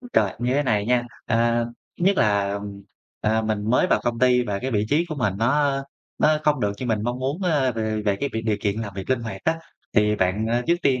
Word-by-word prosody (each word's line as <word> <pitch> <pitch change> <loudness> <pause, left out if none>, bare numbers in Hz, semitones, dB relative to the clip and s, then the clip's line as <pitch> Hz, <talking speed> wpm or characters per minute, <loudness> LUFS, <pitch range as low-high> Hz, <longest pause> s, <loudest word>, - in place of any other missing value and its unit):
Ôi 245 - -11
trời, 100 -3 +3
như 125 +2 0
thế 145 - +3
này 105 -5 +1
nha. 125 -1 +3 0.2
À, 115 +1 +2 0.3
thứ 175 - 0
nhất 195 0 +4
là, 100 -2 +2
ừm, 100 0 -6 0.4
à, 110 +1 +1
mình 110 0 -1
mới 125 - +4
vào - - +2
công 115 -1 -1
ty 125 -1 +4
và 100 -3 -2
cái 130 +4 -3
vị 105 -2 +1
trí 155 +6 +2
của 155 - -3
mình 110 -8 0
nó 135 +4 +2 0.4
nó 155 0 +4
không 150 -3 +2
được 100 -1 +1
như 130 - -4
mình 110 -2 0
mong 120 +2 -2
muốn, 140 +8 -2
ơ, 145 -8 +2
về 110 -1 -2
về 100 -2 +1
cái 140 - -2
việc 110 0 -2
điều 110 -2 +1
kiện 105 +2 -1
làm 100 -3 -5
việc 95 +5 -6
linh 130 - +2
hoạt 100 -4 -6
á, 165 0 +1 0.4
thì 105 -1 +3
bạn, 95 +4 0
à, 120 +2 +1
trước 170 - +4
tiên 130 -2 +2
115 Hz, 260 wpm, -23 LUFS, 105-130 Hz, 0.4 s, nhất